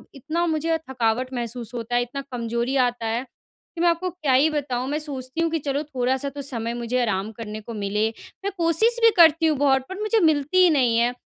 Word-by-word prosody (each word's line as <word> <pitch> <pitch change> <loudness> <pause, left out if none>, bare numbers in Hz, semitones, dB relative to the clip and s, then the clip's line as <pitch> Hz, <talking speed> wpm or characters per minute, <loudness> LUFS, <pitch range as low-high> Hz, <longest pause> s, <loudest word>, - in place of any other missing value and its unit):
इतना 315 +6 -2
मुझे 325 0 0
थकावट 250 +1 -1
महसूस 235 -1 -5
होता 240 0 -3
है, 245 - +3
इतना 250 +3 -4
कमज़ोरी 235 +2 -2
आता 240 -2 -5
है, 230 +3 -1
कि 330 +5 -13
मैं 345 - +5
आपको 350 +2 0
क्या 310 -7 -1
ही 285 +5 +5
बताऊँ 265 -4 -2
मैं 300 +1 -1
सोचती 275 0 -5
हूँ 330 - +2
कि 325 - 0
चलो 280 +1 -2
थोड़ा-सा 265 -1 -1
तो 280 +1 -7
समय 235 -4 -4
मुझे 240 +1 -1
आराम 215 -2 -1
करने 215 -1 -7
को 230 - -8
मिले, 210 +1 0 0.4
मैं 400 - 0
कोशिश 355 +8 +2
भी 455 - +9
करती 325 -1 +6
हूँ 305 -2 +1
बहुत 270 -1 +3
पर 380 +2 -6
मुझे 430 +1 +2
मिलती 315 +1 +3
ही 360 - +6
नहीं 255 -7 +3
है। 240 +1 +2
265 Hz, 220 wpm, -23 LUFS, 235-315 Hz, 0.4 s, भी